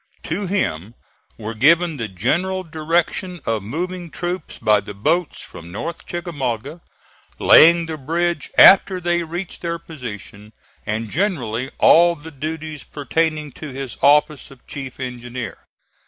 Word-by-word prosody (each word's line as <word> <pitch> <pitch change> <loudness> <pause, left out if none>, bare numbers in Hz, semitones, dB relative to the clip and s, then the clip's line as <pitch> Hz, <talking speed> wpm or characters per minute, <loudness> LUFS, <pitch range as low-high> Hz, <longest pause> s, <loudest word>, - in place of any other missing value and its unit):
To 185 +5 -3
him 105 - -2 0.4
were 110 0 -5
given 160 +7 +3
the 115 -3 -3
general 180 - -1
direction 170 +2 -1
of 110 -2 -1
moving 175 - -4
troops 175 0 -5
by 105 -1 +3
the 105 0 -9
boats 155 - 0
from 85 +1 -11
North 165 - -6
Chickamauga, 145 - -4 0.6
laying 170 +1 +7
the 160 -1 -6
bridge 165 +2 -1
after 190 -1 +7
they 175 0 0
reached 175 +3 -6
their 170 -1 -2
position, 110 - -9 0.3
and 110 0 -3
generally 135 - -1
all 170 +1 +6
the 160 +1 -11
duties 155 +1 -6
pertaining 155 +1 -2
to 155 +4 -9
his 135 -2 -6
office 150 0 +3
of 135 -2 -17
chief 135 -3 -8
engineer. 125 -1 -6
155 Hz, 135 wpm, -20 LUFS, 120-170 Hz, 0.6 s, laying